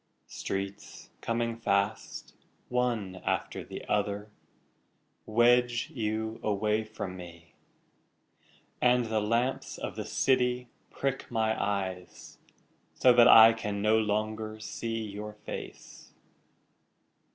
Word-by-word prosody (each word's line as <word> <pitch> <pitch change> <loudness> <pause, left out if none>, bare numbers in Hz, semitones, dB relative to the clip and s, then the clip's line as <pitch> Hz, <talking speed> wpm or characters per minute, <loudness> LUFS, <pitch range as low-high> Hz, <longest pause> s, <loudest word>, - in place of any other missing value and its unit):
Streets 100 +1 -6
coming 115 0 -1
fast, 100 -2 -1 0.4
One 120 -7 -1
after - - -2
the - - -8
other, 105 0 -1 1.0
Wedge 120 +1 +3
you 110 -1 -2
away 105 +1 0
from 105 -4 -6
me, 85 -2 -12 1.3
And 125 -1 +4
the 110 -1 0
lamps 115 +5 -1
of - - -5
the - - -5
city 125 -2 +1 0.2
prick 135 -1 -3
my 110 -2 +1
eyes 95 -3 -4 0.6
So 125 - +5
that 120 0 +7
I 115 -1 +9
can 105 -2 -4
no 110 +1 +4
longer 110 0 -2
see 115 +1 -4
your 105 +1 -7
face. 105 - -9
110 Hz, 105 wpm, -29 LUFS, 105-120 Hz, 1.3 s, I